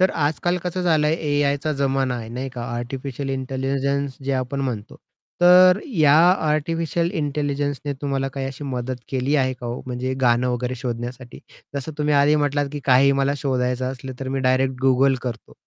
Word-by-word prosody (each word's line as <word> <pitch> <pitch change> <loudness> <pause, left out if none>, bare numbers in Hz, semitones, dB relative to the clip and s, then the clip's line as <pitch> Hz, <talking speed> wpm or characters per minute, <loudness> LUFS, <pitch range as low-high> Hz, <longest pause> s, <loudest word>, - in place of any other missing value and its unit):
तर 185 - +4
आज-काल 160 +4 0
कसं 180 +1 -3
झालंय, 155 -3 +3
एआयचा 145 -1 0
जमाना 135 -2 +1
आहे 115 -2 -7
नाही 125 +3 -4
का? 120 -2 -6
आर्टिफिशियल 135 +3 -5
इंटेलिजन्स 135 +1 -2
जे 140 - -1
आपण 130 +1 -2
म्हणतो. 115 -6 -4 0.4
तर 180 +1 +7 0.2
या 150 -3 +5 0.3
आर्टिफिशियल 165 +2 0
इंटेलिजन्सने 145 -1 -2
तुम्हाला 135 -1 -1
काही 135 0 -4
अशी 135 +2 -7
मदत 130 -1 -3
केली 135 +2 0
आहे 130 -1 +2
का 125 -1 -8
ओ, 120 +1 -4
म्हणजे 125 +1 -3
गाणं 125 0 +3
वगैरे 125 +1 -2
शोधण्यासाठी? 120 0 -6 0.4
जसं 140 +3 -4
तुम्ही 150 0 +1
आधी 145 +1 +4
म्हटलात 145 -1 +1
की 145 - -4
काही 135 +1 +5
मला 135 +1 +2
शोधायचं 130 -2 -1
असलं, 130 0 -8
तर 135 - -4
मी 135 +1 -1
डायरेक्ट 130 +1 +2
Google 135 +1 +4
करतो. 120 -3 -6
135 Hz, 170 wpm, -22 LUFS, 130-145 Hz, 0.4 s, तर